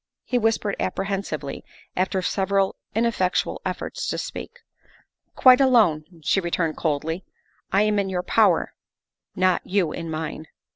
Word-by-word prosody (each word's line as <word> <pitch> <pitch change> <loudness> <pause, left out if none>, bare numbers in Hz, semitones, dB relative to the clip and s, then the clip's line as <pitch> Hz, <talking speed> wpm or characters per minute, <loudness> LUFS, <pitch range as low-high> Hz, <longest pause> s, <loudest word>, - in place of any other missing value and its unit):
he 250 - 0
whispered 220 -2 +1
apprehensively, 190 -7 -3 0.3
after 185 0 0
several 195 0 +1 0.2
ineffectual 220 -5 0
efforts - - -4
to - - -1
speak. - - -7 0.4
" - - -33 0.3
Quite 255 +1 +7
alone," 220 - +4 0.2
she 150 - +2
returned 170 -3 -1
coldly. 160 +3 -2 0.3
" - - -40
I 200 +2 +4
am 210 -1 +2
in 195 -1 -1
your 180 -1 -2
power 195 -3 +3 0.6
not 185 -1 +2
you 185 -5 0
in 165 0 -5
mine." 155 0 -5
190 Hz, 140 wpm, -24 LUFS, 165-210 Hz, 0.6 s, Quite